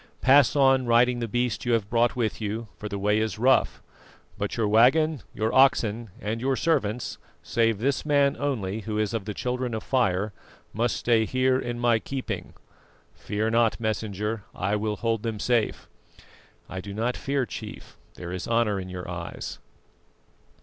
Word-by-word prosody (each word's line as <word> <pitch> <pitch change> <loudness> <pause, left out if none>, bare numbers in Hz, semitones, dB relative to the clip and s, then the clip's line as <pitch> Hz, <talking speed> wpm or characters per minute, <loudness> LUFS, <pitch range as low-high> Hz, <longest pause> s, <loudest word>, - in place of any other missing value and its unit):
Pass 135 +1 +5
on 135 -2 +4
riding 120 +1 +4
the 115 - -2
beast 120 +1 -1
you 120 - +1
have 110 -3 +1
brought 120 +2 +2
with 115 -2 -1
you, 110 +1 -4
for 105 - -5
the 100 - -4
way 105 +2 +2
is 110 -2 -1
rough; 130 +4 +2 0.5
but 100 +3 -3
your 110 -2 +1
waggon, 130 +8 +4
your 110 +1 -2
oxen, 120 -4 +3
and 110 +3 -3
your 135 +1 +1
servants, 125 -8 -1 0.2
save 115 -2 +1
this 135 +5 0
man 140 -2 +3
only 110 -8 -2
who 110 0 -4
is 110 0 0
of 110 -4 -3
the 105 -1 -5
Children 125 -1 -2
of 110 - -4
Fire, 105 -5 +1 0.4
must 115 +2 0
stay 115 -2 +2
here 130 +2 +2
in 120 -2 -4
my 120 -2 +3
keeping. 135 +3 -5 0.6
Fear 110 +2 -2
not, 115 -1 +2
Messenger, 110 -1 -2
I 100 +2 0
will 105 0 -1
hold 115 -1 -1
them 110 -2 -3
safe." 120 0 0 0.8
"I 95 +1 -6
do 100 +1 -8
not 120 +3 -1
fear, 140 -1 -1
Chief, - - -9 0.2
there 85 -1 -7
is 90 - -5
honour 115 -4 +1
in 95 0 -7
your 90 -1 -6
eyes." 85 -1 -6
115 Hz, 170 wpm, -26 LUFS, 105-125 Hz, 0.8 s, Pass